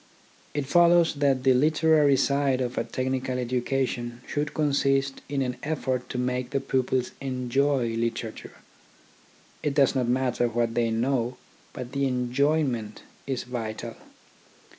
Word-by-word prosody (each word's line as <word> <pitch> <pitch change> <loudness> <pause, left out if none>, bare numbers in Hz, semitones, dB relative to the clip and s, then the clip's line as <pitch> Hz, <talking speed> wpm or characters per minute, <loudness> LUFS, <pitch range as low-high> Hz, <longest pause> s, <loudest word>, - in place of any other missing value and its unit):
It 145 -2 -1
follows 170 +2 +5
that 140 -3 +1
the 130 -1 +5
literary 155 0 +4
side 140 -2 +2
of 125 -1 -2
a - - 0
technical 130 +2 -2
education 125 -1 -2
should 150 +1 -3
consist 140 -2 +1
in 140 -1 0
an 125 -1 -3
effort 130 -4 -2
to - - -4
make 125 0 -1
the 140 0 0
pupils 130 -1 0
enjoy 130 0 0
literature. 115 0 -3 1.1
It 145 -2 -1
does 140 -3 +4
not 130 -3 0
matter 125 -1 +1
what 115 0 -1
they 115 -1 +1
know, 120 +2 0 0.3
but 125 -3 -7
the 140 0 0
enjoyment 125 -3 0 0.2
is 130 -3 -2
vital. 115 -3 -5
130 Hz, 135 wpm, -26 LUFS, 120-140 Hz, 1.1 s, follows